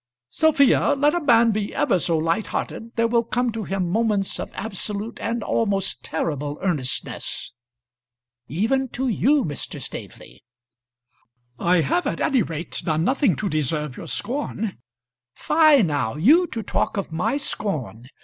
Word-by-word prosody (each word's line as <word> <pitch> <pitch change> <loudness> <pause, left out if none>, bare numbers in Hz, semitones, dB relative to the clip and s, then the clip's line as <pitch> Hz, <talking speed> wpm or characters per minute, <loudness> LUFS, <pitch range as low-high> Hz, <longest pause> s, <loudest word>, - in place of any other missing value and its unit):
"Sophia, 285 -2 +4
let 290 +2 +3
a 350 - 0
man 235 -5 +5
be 210 -1 -3
ever 185 - +2
so 165 0 +1
light 165 +6 0
hearted, 230 +1 -4
there 230 0 +2
will 235 0 +2
come 240 +1 0
to 225 -2 -5
him 190 -2 -1
moments 210 0 0
of - - -4
absolute 210 +1 -4
and 230 -1 -2
almost 200 -4 -1
terrible 150 -2 -3
earnestness." 150 - -2 0.9
"Even 230 - 0
to 260 +3 -2
you, 265 +4 +2
Mr. 145 -2 -5
Staveley." - - -9 1.2
"I 175 0 +3
have 155 +5 0
at 165 - -2
any 265 -4 +2
rate 165 -2 -3
done 160 -1 0
nothing 255 - +2
to 200 - -3
deserve 150 -3 -1
your - - -8
scorn." 225 - -3 0.6
"Fie, 310 -5 +5
now; 145 -8 -1
you 300 - +5
to 225 -7 -5
talk - - -1
of 195 - -3
my 220 - 0
scorn! 155 - -4
205 Hz, 150 wpm, -23 LUFS, 160-240 Hz, 1.2 s, man